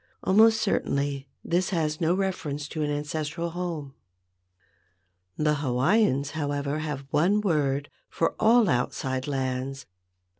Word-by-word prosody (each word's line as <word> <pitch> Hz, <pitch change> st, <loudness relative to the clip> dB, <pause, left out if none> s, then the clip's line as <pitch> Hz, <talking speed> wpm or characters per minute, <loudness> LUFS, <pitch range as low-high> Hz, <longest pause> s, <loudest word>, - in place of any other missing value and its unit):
Almost 220 Hz, +3 st, +5 dB
certainly 140 Hz, -9 st, -1 dB, 0.2 s
this 180 Hz, +2 st, +1 dB
has 155 Hz, -4 st, -1 dB
no 165 Hz, +2 st, +3 dB
reference 155 Hz, -7 st, -2 dB
to 155 Hz, -, -4 dB
an 150 Hz, -, 0 dB
ancestral 150 Hz, +3 st, -3 dB
home. 165 Hz, -6 st, -4 dB, 1.4 s
The 150 Hz, 0 st, +2 dB
Hawaiians, 140 Hz, -, +2 dB
however, 145 Hz, -1 st, -2 dB
had 150 Hz, -3 st, -4 dB
one 185 Hz, +7 st, +3 dB
word 145 Hz, -7 st, 0 dB, 0.2 s
for 165 Hz, -, 0 dB
all 230 Hz, 0 st, +5 dB
outside 130 Hz, -1 st, -1 dB
lands. 135 Hz, 0 st, -3 dB
150 Hz, 115 wpm, -26 LUFS, 140-175 Hz, 1.4 s, Almost